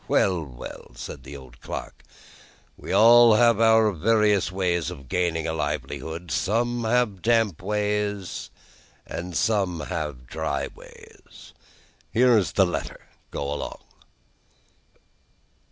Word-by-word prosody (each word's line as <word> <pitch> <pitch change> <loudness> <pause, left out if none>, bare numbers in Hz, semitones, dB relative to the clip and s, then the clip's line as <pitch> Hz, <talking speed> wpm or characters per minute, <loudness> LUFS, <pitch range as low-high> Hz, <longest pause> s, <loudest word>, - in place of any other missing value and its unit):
"Well, 90 -4 +2
well," 60 -3 -10
said 65 - -8
the 70 - -9
old 65 -3 -15
clerk; - - -7 0.7
"we - - -8
all 115 0 +7
have 115 -1 +4
our 110 -1 +5
various 105 +1 +2
ways 90 -4 0
of 70 -6 -10
gaining 80 +1 -1
a 80 - -2
livelihood. 80 +1 -4
Some 115 - 0
of 115 - -3
us - - 0
have 105 -7 0
damp 115 -7 +1
ways, 105 -2 -2 0.6
and 85 0 -5
some 100 -5 +1
of 85 - -6
us - - -7
have 75 -8 -4
dry 80 +5 -3
ways. - - -16 0.6
Here 125 +1 +4
is 100 -5 +1
the 95 - +4
letter. 90 - -4 0.3
Go 70 0 -3
along." 75 - -5
95 Hz, 135 wpm, -25 LUFS, 80-110 Hz, 0.7 s, all